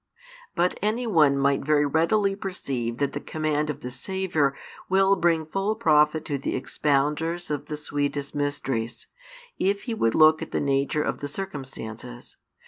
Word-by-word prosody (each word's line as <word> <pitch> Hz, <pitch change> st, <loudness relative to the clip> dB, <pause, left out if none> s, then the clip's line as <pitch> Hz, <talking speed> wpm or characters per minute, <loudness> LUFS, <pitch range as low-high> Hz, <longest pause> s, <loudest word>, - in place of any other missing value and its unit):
|412 -, -, -46 dB
But 175 Hz, +1 st, +1 dB
any 220 Hz, +5 st, 0 dB
one 155 Hz, -10 st, +4 dB
might 140 Hz, 0 st, +2 dB
very 150 Hz, 0 st, +3 dB
readily 195 Hz, +7 st, +2 dB
perceive 135 Hz, -12 st, -4 dB
that 140 Hz, 0 st, -1 dB
the 145 Hz, -, -3 dB
command 155 Hz, 0 st, -1 dB
of 150 Hz, -, -4 dB
the 125 Hz, -, -6 dB
Saviour 160 Hz, -1 st, -1 dB, 0.3 s
will 195 Hz, +1 st, +4 dB
bring 170 Hz, -3 st, +2 dB
full 195 Hz, +7 st, -1 dB
profit 155 Hz, -7 st, +3 dB
to 145 Hz, -2 st, -2 dB
the -, -, -2 dB
expounders 150 Hz, +5 st, 0 dB
of 145 Hz, -, -3 dB
the 150 Hz, -, -4 dB
sweetest 145 Hz, -1 st, -2 dB
mysteries, 135 Hz, -5 st, -2 dB, 0.5 s
if 200 Hz, +1 st, +1 dB
he 235 Hz, -, -3 dB
would 115 Hz, -, +1 dB
look 155 Hz, 0 st, +6 dB
at 160 Hz, -, -5 dB
the -, -, -1 dB
nature 140 Hz, +2 st, +1 dB
of -, -, -2 dB
the 145 Hz, -, -4 dB
circumstances. 130 Hz, -, -7 dB
150 Hz, 165 wpm, -25 LUFS, 140-180 Hz, 0.5 s, look